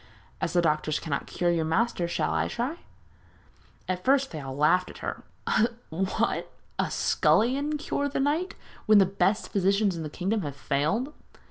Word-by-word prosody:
As -, -, -1 dB
the 175 Hz, -1 st, +3 dB
doctors 155 Hz, -1 st, +1 dB
cannot 145 Hz, -4 st, -3 dB
cure 175 Hz, -1 st, 0 dB
your 165 Hz, -2 st, +1 dB
master 175 Hz, +2 st, +1 dB
shall 160 Hz, -2 st, -1 dB
I -, -, +1 dB
try?' 255 Hz, +8 st, -3 dB, 1.1 s
At 185 Hz, -1 st, -2 dB
first 270 Hz, 0 st, +3 dB
they 155 Hz, -, -5 dB
all 135 Hz, -1 st, -6 dB
laughed 180 Hz, +5 st, +3 dB
at -, -, -11 dB
her. -, -, -4 dB, 0.7 s
'What! 190 Hz, +4 st, -1 dB, 0.3 s
a -, -, +1 dB
scullion 280 Hz, +6 st, +2 dB
cure 285 Hz, -1 st, -2 dB
the 280 Hz, -, -2 dB
knight 310 Hz, +7 st, 0 dB, 0.3 s
when 215 Hz, -1 st, +7 dB
the 195 Hz, -, +7 dB
best 195 Hz, +2 st, 0 dB
physicians 195 Hz, 0 st, +2 dB
in 165 Hz, -, -4 dB
the 155 Hz, -, -4 dB
kingdom 195 Hz, +7 st, -1 dB
have 145 Hz, -5 st, -5 dB
failed?' 160 Hz, -, -1 dB
190 Hz, 165 wpm, -27 LUFS, 160-240 Hz, 1.1 s, when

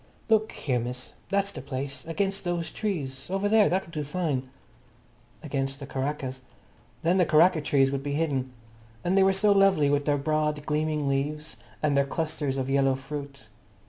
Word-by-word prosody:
"Look 220 Hz, 0 st, +3 dB
here, 130 Hz, -4 st, -1 dB
miss, 125 Hz, +2 st, -6 dB, 0.2 s
that's 200 Hz, 0 st, +1 dB
the -, -, -7 dB
place. 135 Hz, 0 st, -5 dB
Against 195 Hz, +4 st, -1 dB
those 175 Hz, -2 st, -2 dB
trees. 145 Hz, -10 st, -3 dB
Over 195 Hz, +2 st, 0 dB
there. 215 Hz, 0 st, +5 dB
That'll 185 Hz, -2 st, -1 dB
do 150 Hz, -2 st, -3 dB
fine." 145 Hz, -4 st, -2 dB, 0.9 s
Against 135 Hz, -2 st, -2 dB
the 140 Hz, -, -6 dB
karakas. 135 Hz, -1 st, -3 dB, 0.6 s
Then 175 Hz, +3 st, +3 dB
the 180 Hz, -, +5 dB
karaka 160 Hz, +2 st, +5 dB
trees 135 Hz, -2 st, +3 dB
would 140 Hz, -1 st, -2 dB
be 140 Hz, 0 st, -3 dB
hidden. 140 Hz, -4 st, -1 dB, 0.5 s
And 180 Hz, +2 st, +1 dB
they 195 Hz, -, +5 dB
were 190 Hz, 0 st, +5 dB
so 205 Hz, +2 st, +3 dB
lovely, 195 Hz, -8 st, +4 dB
with 145 Hz, 0 st, +1 dB
their 145 Hz, -1 st, +2 dB
broad, 150 Hz, 0 st, 0 dB
gleaming 150 Hz, -1 st, 0 dB
leaves, 150 Hz, +2 st, -2 dB, 0.3 s
and 150 Hz, -2 st, +2 dB
their 140 Hz, 0 st, +3 dB
clusters 155 Hz, -3 st, -2 dB
of 130 Hz, -1 st, -1 dB
yellow 135 Hz, -1 st, +3 dB
fruit. 140 Hz, -2 st, -7 dB
150 Hz, 175 wpm, -27 LUFS, 135-175 Hz, 0.9 s, there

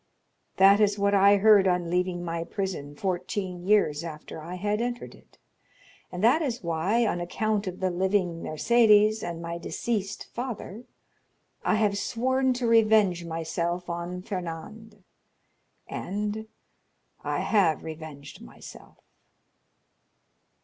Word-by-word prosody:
"That 195 Hz, +2 st, +6 dB
is 205 Hz, -1 st, +3 dB
what 200 Hz, 0 st, +1 dB
I 200 Hz, +1 st, +6 dB
heard 205 Hz, -1 st, +6 dB
on 180 Hz, -2 st, 0 dB
leaving 180 Hz, 0 st, -1 dB
my 165 Hz, 0 st, -3 dB
prison 170 Hz, -6 st, -5 dB
fourteen 180 Hz, +1 st, -3 dB
years 170 Hz, -7 st, +3 dB
after 155 Hz, -1 st, -8 dB
I 170 Hz, +4 st, -7 dB
had 205 Hz, +4 st, -1 dB
entered 240 Hz, 0 st, -4 dB
it; -, -, -21 dB, 0.7 s
and 180 Hz, +3 st, -5 dB
that 255 Hz, +8 st, +5 dB
is 250 Hz, -8 st, -3 dB
why, 175 Hz, +8 st, +1 dB
on 175 Hz, -5 st, -1 dB
account 210 Hz, +3 st, -1 dB
of 185 Hz, 0 st, -6 dB
the 185 Hz, -1 st, +1 dB
living 180 Hz, -2 st, 0 dB
Mercédès 215 Hz, +4 st, +4 dB
and 170 Hz, -1 st, -5 dB
my 170 Hz, 0 st, -5 dB
deceased 200 Hz, +2 st, -3 dB
father, 240 Hz, -2 st, -6 dB, 0.8 s
I -, -, +2 dB
have 210 Hz, -2 st, +1 dB
sworn 260 Hz, +4 st, 0 dB
to 245 Hz, 0 st, -3 dB
revenge 215 Hz, -6 st, +4 dB
myself 170 Hz, +2 st, -3 dB
on 175 Hz, +1 st, -5 dB
Fernand, 200 Hz, +4 st, -7 dB, 0.8 s
and—I 210 Hz, +3 st, -6 dB
have 185 Hz, -8 st, +2 dB
revenged 155 Hz, -3 st, -9 dB
myself." -, -, -13 dB
190 Hz, 120 wpm, -27 LUFS, 170-215 Hz, 0.8 s, That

